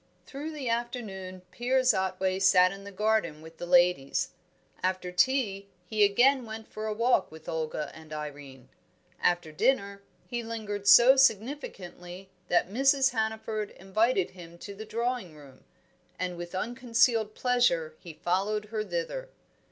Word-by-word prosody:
Through 295 +3 -7
the 285 -4 -5
afternoon 220 -6 -4
Piers 255 +1 +2
Otway 190 0 -1
sat 185 -1 +5
in 195 +1 -10
the 200 - -8
garden 210 -6 0
with 160 +1 -13
the 175 - -5
ladies. 175 -6 +3 0.5
After 185 -1 -1
tea 200 -1 +1 0.2
he 210 +3 +1
again 245 +6 +4
went 220 -1 -8
for 215 0 -6
a 215 - -1
walk 230 -5 +2
with 160 0 -13
Olga 155 -1 -3
and 160 -1 -14
Irene. 145 -4 -8 0.5
After 175 -3 +1
dinner 200 - 0 0.2
he 240 -1 -4
lingered 215 -3 -5
so 245 +6 +8
significantly 195 -7 -1 0.2
that 175 - +2
Mrs. 270 +5 +3
Hannaford 220 -2 -2
invited 195 +1 0
him 170 -2 -12
to 200 +3 -9
the 215 +2 -9
drawing 235 -7 -3
room, 140 -3 -16 0.5
and 180 -1 -3
with 175 +1 -7
unconcealed 230 0 +1
pleasure 240 -11 +1
he 170 -3 -10
followed 195 +6 -1
her 215 -1 -1
thither. 200 - -4
200 Hz, 145 wpm, -28 LUFS, 175-235 Hz, 0.5 s, so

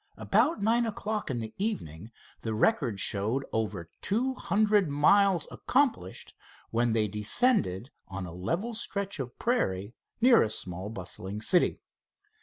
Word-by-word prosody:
About 310 -10 +1
nine 230 +2 +2
o'clock 215 0 -3
in 120 -3 -2
the 110 -1 -7
evening 110 - -4 0.3
the 110 -1 -3
record 120 - +1
showed 110 +8 +1
over 105 -6 -2
two 245 +7 0
hundred 210 -6 +2
miles 180 +5 +4
accomplished, 250 - -1 0.4
when 120 0 +1
they 110 -1 +2
descended 110 - +1 0.2
on 95 -1 -5
a 85 - -8
level 170 - -2
stretch 200 -5 -3
of 125 -2 -6
prairie 100 - -1 0.3
near 240 0 +6
a 110 - +1
small 95 -1 -4
bustling 95 0 -6
city. 175 +11 +2
130 Hz, 135 wpm, -29 LUFS, -, 0.4 s, near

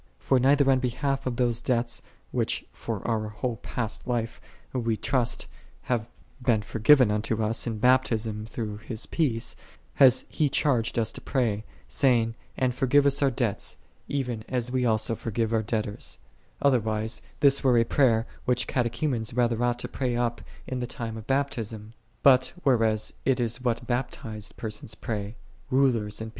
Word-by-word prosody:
For 130 - +2
neither 140 +2 +4
on 130 - +3
behalf 135 +2 -1
of 125 - -1
those 120 -1 +1
debts, 120 -1 0 0.2
| - - -36
which - - -1
for - - -5
our 110 -2 0
whole 115 +2 -3
past 115 +1 -4
life 120 -2 -2 0.3
we 115 -3 0
trust 125 -1 0 0.4
have 120 -3 0
j - - -28 0.3
been 115 -3 +2
forgiven 115 +2 +5
unto 110 +1 0
us 115 +3 0
in 115 -2 -2
Baptism 115 -3 +2
through 110 -2 -5
j 110 - -19
His 110 -2 -4
peace, 125 -9 -1 0.4
hath 130 -4 +6
He 150 -2 0
charged 125 -7 +1
us 115 -1 +1
to - - -10
pray, 110 -5 0 0.2
say 125 - +3
j 115 - +3
ing, 115 0 -5 0.2
"And 130 -1 +1
forgive 135 +3 +3
us 140 0 +3
our 140 - +4
debts, 120 -5 -2 0.3
even 125 -6 -2
as 125 -1 -1
we 125 -1 +1
also 110 0 +2
forgive 115 0 -2
our 110 - +3
debtors: 110 -1 -2 0.2
" - - -35
otherwise 110 -5 +1 0.2
this 140 0 +5
were 130 -3 +4
j - - +6
a - - +1
prayer 115 -4 +3 0.2
which 125 -1 +2
Catechumens 120 -1 -1
rather 120 -1 +2
ought 120 0 +1
to - - -4
pray 125 -3 -2
up 120 0 -1 0.3
to - - -4
the 125 -1 -3
time 115 -2 -5
of 110 -1 -9
Baptism; 115 -6 -2 0.3
but 130 -2 +6
whereas 115 -5 +2
it 130 -1 +2
is 120 +1 -1
what 120 -1 -1
baptized 120 -3 -4
persons 110 -1 -5
pray, 105 -1 -4 0.3
rulers 120 -6 +2
and 110 - -4
120 Hz, 175 wpm, -27 LUFS, 110-130 Hz, 0.4 s, hath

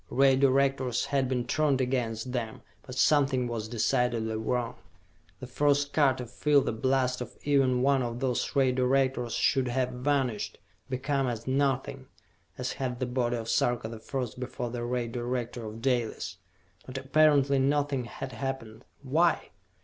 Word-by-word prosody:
Ray 135 0 +4
Directors 135 -2 +2
had 135 -2 0
been 125 -2 -1
turned 150 -4 +1
against 125 -2 -1
them, 115 -3 -4 0.2
but 130 - -9
something 135 -3 +3
was 115 -2 -4
decidedly 115 0 0
wrong. 115 +2 -2 0.6
The 130 - -7
first 145 +2 +1
car 140 -4 +4
to 125 - -6
feel 140 +4 +2
the - - -1
blast 130 +2 0
of 125 - -7
even 135 -3 +2
one 135 -1 +3
of 120 -1 -3
those 130 +2 -1
Ray 135 -2 +4
Directors 130 -1 +1
should 135 -2 +2
have 125 +1 0
vanished, 125 -3 -1 0.3
become 135 +1 0
as 115 -2 -4
nothing, 135 0 -1 0.5
as 125 0 -2
had 125 -3 -3
the 130 - 0
body 125 -1 0
of 115 -1 -5
Sarka 120 -1 +1
the 115 -1 -8
First 125 0 -4
before 125 -1 -4
the 120 -1 -4
Ray 120 0 -1
Director 120 0 -3
of 110 +1 -9
Dalis. 115 -8 -1 0.5
But 130 0 -6
apparently 140 0 +3
nothing 140 -1 +1
had 130 +2 -7
happened. 130 -4 -5 0.2
Why? 160 +5 +2
130 Hz, 155 wpm, -28 LUFS, 120-135 Hz, 0.6 s, Ray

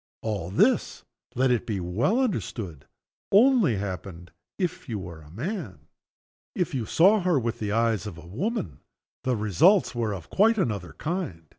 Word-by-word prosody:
All 100 -6 -3
this, 95 - +2 0.3
let 130 +1 +3
it 120 0 0
be 105 -4 -1
well 110 - +1
understood, 115 - -3 0.4
only 220 - +5
happened 90 -3 -6 0.3
if 180 -7 -3
you 110 - -2
were 85 -4 -8
a 75 - -15
man. 110 - -6 0.7
If 180 -2 -1
you 120 -5 -2
saw 195 +6 +5
her 180 -6 +2
with 115 -1 -3
the 105 -2 -2
eyes 115 -1 +1
of 90 -5 -8
a 85 - -12
woman, 110 - -3 0.5
the 130 -1 +2
results 110 - +3
were 115 -4 -1
of 90 - -11
quite 220 +3 +4
another 105 - -2
kind. 155 - -4
115 Hz, 160 wpm, -26 LUFS, -, 0.7 s, only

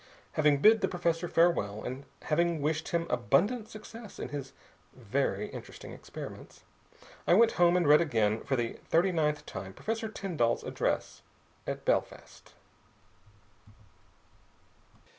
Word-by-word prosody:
Having 150 -2 +3
bid 220 0 +7
the 190 - +2
professor 175 -1 -1
farewell 165 -13 +2
and 130 +2 -5 0.6
wished 155 +2 -1
him 170 -1 0
abundant 200 - +1
success 220 0 -10
in - - -5
his 140 -2 -6 0.4
very - - -1
interesting - - -9
experiments, - - -10 0.6
I 175 - +6
went 230 +2 +6
home 175 0 +4
and 175 -4 +2
read 150 +2 +7
again 110 -8 +1
for 135 - 0
the 120 -2 -2
thirty 175 +3 +3
ninth 150 -3 0
time 95 -1 -7
Professor 225 - -3
Tyndall's 170 - -1
address - - -2 0.5
at - - -4
Belfast. - - -2
165 Hz, 120 wpm, -30 LUFS, 135-190 Hz, 0.6 s, bid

